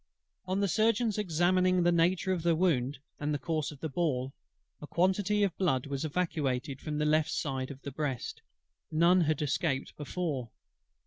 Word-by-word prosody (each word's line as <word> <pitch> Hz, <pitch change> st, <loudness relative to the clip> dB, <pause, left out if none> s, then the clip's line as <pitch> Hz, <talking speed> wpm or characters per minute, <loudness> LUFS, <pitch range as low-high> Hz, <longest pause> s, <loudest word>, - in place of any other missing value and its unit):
On 190 Hz, +2 st, 0 dB
the 200 Hz, -, +2 dB
Surgeon's 220 Hz, +2 st, +2 dB
examining 185 Hz, 0 st, +2 dB
the 175 Hz, -, +4 dB
nature 180 Hz, +3 st, +2 dB
of 180 Hz, -, -2 dB
the 170 Hz, 0 st, +3 dB
wound, 145 Hz, -6 st, +1 dB, 0.2 s
and 150 Hz, 0 st, -1 dB
the 145 Hz, -, +1 dB
course 155 Hz, -1 st, -2 dB
of 145 Hz, -, -13 dB
the 160 Hz, -, -1 dB
ball, 135 Hz, -4 st, -1 dB, 0.5 s
a 150 Hz, -, -7 dB
quantity 190 Hz, +5 st, +2 dB
of 195 Hz, -4 st, 0 dB
blood 135 Hz, -10 st, +1 dB
was 140 Hz, 0 st, -3 dB
evacuated 145 Hz, -5 st, -1 dB
from 150 Hz, -1 st, -3 dB
the 150 Hz, -, +1 dB
left 155 Hz, +1 st, +3 dB
side 135 Hz, -5 st, -2 dB
of 140 Hz, -1 st, -10 dB
the 140 Hz, -, -5 dB
breast: 135 Hz, -3 st, -3 dB, 0.5 s
none 170 Hz, +3 st, +4 dB
had 155 Hz, -2 st, +1 dB
escaped 140 Hz, -1 st, -1 dB
before. 150 Hz, -5 st, -3 dB
160 Hz, 175 wpm, -30 LUFS, 140-180 Hz, 0.5 s, the